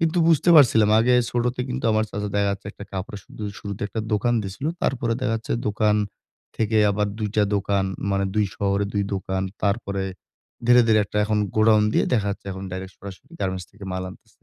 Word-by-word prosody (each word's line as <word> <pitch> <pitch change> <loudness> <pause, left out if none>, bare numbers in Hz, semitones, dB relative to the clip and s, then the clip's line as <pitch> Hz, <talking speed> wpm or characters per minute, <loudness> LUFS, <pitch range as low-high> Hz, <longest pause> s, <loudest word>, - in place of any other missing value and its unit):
কিন্তু 165 +1 +1
বুঝতে 165 +2 +4
পারছিলাম 110 -6 +6
আগে 125 +2 +4 0.2
ছোটতে 120 +1 -1
কিন্তু 125 +1 -4
আমার 110 0 +2
চাচা 105 0 -3
দেখা-যাচ্ছে 100 -1 0
একটা 100 - -10
কাপড়ে 95 +2 -5
শুধু 110 - -11 0.2
শুরুতে 100 -1 -6
একটা 110 - -3
দোকান 120 +3 +2
দিছিলো। 100 +11 -4
তারপরে 120 -3 0
দেখা 125 -3 0
যাচ্ছে 115 - -5 0.2
দোকান 105 0 +2 0.6
থেকে 110 0 +1
আবার 105 +1 0
২ 105 -1 -1
টা 105 - +5
দোকান, 100 0 0 0.3
মানে 100 0 +1
২ 105 -1 +3
শহরে 100 0 0
২ 100 - +1
দোকান। 95 0 -2 0.2
তারপরে, 100 -2 -1 0.6
ধীরে, 120 0 +7
ধীরে 110 -1 +4
একটা 105 - -8
এখন 105 0 0 0.2
গোডাউন 110 -1 +5
দিয়ে, - - +3
দেখাচ্ছে 100 -3 -1
এখন 95 +1 -7
ডাইরেক্ট 95 +1 -6
সরাসরি 100 +4 -11
গার্মেন্টস 95 -2 -2
থেকে 100 -1 -12
মাল 95 0 -3
আনতেছে। - - -19
105 Hz, 185 wpm, -23 LUFS, 100-115 Hz, 0.6 s, ধীরে